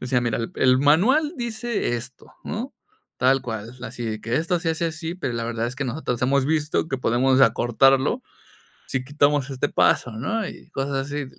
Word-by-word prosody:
decía: 125 0 +1
"Mira, 120 -2 0
el 115 - -4
el 130 0 +4
manual 220 - +4
dice 235 - -2
esto, 120 +2 -9 0.2
¿no?, 235 +7 -5 0.4
tal 135 +1 +3
cual, 115 0 -6
así 120 0 -6
de 110 -1 -3
que 115 +3 -2
esto 170 +2 0
se 170 - -2
hace 160 +1 -1
así, 165 +1 -3
pero 170 -9 -3
la 115 0 -3
verdad 115 0 -2
es 125 - -5
que 135 - -3
nosotros 125 -2 -3
hemos 135 +1 +2
visto 150 +1 0
que 135 -4 -3
podemos 130 +2 +2
acortarlo, 135 - +3 0.6
si 130 -1 -2
quitamos 145 0 +1
este 135 +2 -1
paso", 120 - +2
¿no?, 190 - -2
y - - -11
cosas 135 -2 -2
así. 145 -1 -3
135 Hz, 190 wpm, -23 LUFS, 120-160 Hz, 0.6 s, el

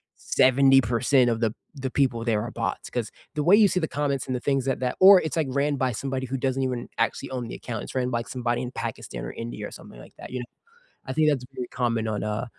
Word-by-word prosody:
70% 130 -1 +4
of 115 - 0
the 115 -2 0 0.2
the 130 -2 -4
people 125 -5 +1
there 110 -3 +1
are 120 - -4
bots, 115 0 -3
'cause 120 -3 -3 0.2
the 150 - 0
way 185 +6 +7
you 210 -1 +6
see 185 - 0
the 160 - -1
comments 140 -2 -1
and 130 -1 -2
the - - -2
things 135 0 0
that 135 -2 -1
that 125 -1 -1
or 190 0 +9
it's, 160 +1 -3
like, 155 -4 +1
ran 140 +2 +1
by 130 -2 0
somebody 130 +3 -3
who 130 +1 -3
doesn't 135 0 -1
even 125 -2 -2
actually 115 +4 -1
own 125 -3 -4
the - - -7
account, 115 -3 -5
it's - - -9
ran 125 -1 0
by 120 -1 -1
somebody 120 -1 -2
in 125 - -5
Pakistan - - -5
or - - -5
India 115 +1 -6
or - - -12
something - - -12
like - - -15
that, - - -10
you 125 - -3
know? 120 - -5 0.6
I 130 - -4
think 155 +2 +3
that's 135 -4 0
a - - -10
pretty 125 0 -6
common 115 -3 0
on, 105 -1 -2
uh 105 +3 -2
130 Hz, 260 wpm, -25 LUFS, 120-135 Hz, 0.6 s, or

